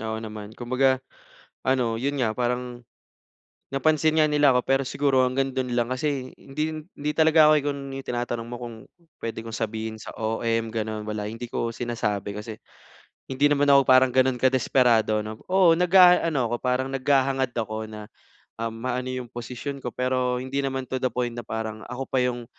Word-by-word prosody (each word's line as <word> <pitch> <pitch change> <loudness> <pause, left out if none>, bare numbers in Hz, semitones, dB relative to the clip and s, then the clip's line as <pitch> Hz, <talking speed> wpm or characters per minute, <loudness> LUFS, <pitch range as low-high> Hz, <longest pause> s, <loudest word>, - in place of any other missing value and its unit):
oo 110 0 -3
naman. 110 0 -8
Kumbaga 130 +2 +2 0.7
ano, 125 -3 +1
'yon 140 +4 -2
nga, 110 -4 0
parang, 125 0 -2 0.9
napansin 155 +3 +2
nga 155 - +3
nila 145 -2 +4
ako 125 - +3
pero 135 +2 +1
siguro 135 -1 +2
hanggang 135 +1 0
do'n 130 -1 -3
lang 120 0 0
kasi 130 0 -2
hindi 155 +2 -4
hindi 145 +1 -3
talaga 155 -1 +6
ako - - +6
igun 145 -1 -2
yung 135 0 -7
tinatanong 120 -1 -3
mo 120 +1 -7
kung, 120 -2 -6 0.4
puwede 115 -1 -5
kong 115 0 -7
sabihin 110 -1 -3
sa 110 - -9
OM, 115 +1 -1
gano'n, 110 -1 -4
wala 105 -1 -3
hindi 115 +3 -6
ko 115 0 -2
sinasabi 105 -4 -3
kasi, 105 +1 -7 0.7
hindi 135 +2 +3
naman 145 0 +2
ako 140 -1 +6
parang 130 0 +6
gano'n 130 0 +3
kadesperado, 120 -4 +3
'no? 110 +1 -7
Oo, 180 -3 +5
nag-aano 180 -4 +5
ako, 120 - +1
parang 130 +1 0
naghahangad 135 -1 +1
ako 110 -1 -3
na, 105 -1 -9 0.5
um, 115 0 -2
maano 125 +3 -3
yung 125 -1 -5
posisyon 125 +4 -6
ko, 125 - -2
pero 125 -1 0
hindi 130 +2 -2
naman 135 -1 -2
to 130 0 -3
the 130 - +1
point 120 0 -2
na 120 - -5
parang, 110 0 -5
ako 125 +2 -4
pa 130 - +1
yung 120 -1 -2
125 Hz, 180 wpm, -25 LUFS, 115-135 Hz, 0.9 s, talaga